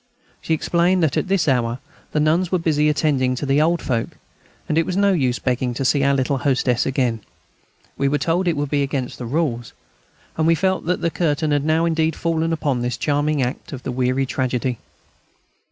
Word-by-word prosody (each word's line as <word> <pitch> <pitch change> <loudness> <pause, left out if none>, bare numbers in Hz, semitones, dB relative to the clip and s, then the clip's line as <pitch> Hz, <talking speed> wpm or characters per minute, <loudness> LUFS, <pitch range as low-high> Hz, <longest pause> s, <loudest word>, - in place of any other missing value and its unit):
She 160 - 0
explained 175 +3 +1
that 155 - +1
at - - 0
this 190 -4 +1
hour 120 -3 +1 0.3
the 150 - 0
nuns 165 +4 +2
were 185 - +3
busy 150 -3 +1
attending 140 -4 +1
to 135 - -4
their 140 +2 +3
old 170 +2 +1
folk. 115 -4 -2 0.5
It 160 +2 +2
was 180 +2 -3
of 200 - +2
no 200 -1 +4
use 130 -7 +1
begging 125 -1 -1
to 135 - -2
see 140 +2 +2
our 140 0 +3
little 135 0 0
hostess 130 -2 +1
again. 125 -4 0 0.8
We 140 - +2
were 145 +2 +1
told 170 +6 0
it 170 - +1
would 145 -1 -2
be 145 -1 +2
against 135 -2 -3
the 120 - -5
rules, 125 -4 -2 0.6
and 160 0 +2
we 165 - +5
felt 185 +1 -1
that 180 - 0
the 170 - 0
curtain 155 -2 0
had 145 0 +1
now 160 +1 +2
indeed 160 -1 +1
fallen 165 -1 -1
upon 145 -6 -1
this 120 -1 -2
charming 145 +2 0
act 125 +3 -5
of 130 -1 -7
the - - -3
weary 130 +1 0
tragedy. 125 -2 -2
145 Hz, 205 wpm, -21 LUFS, 130-165 Hz, 0.8 s, we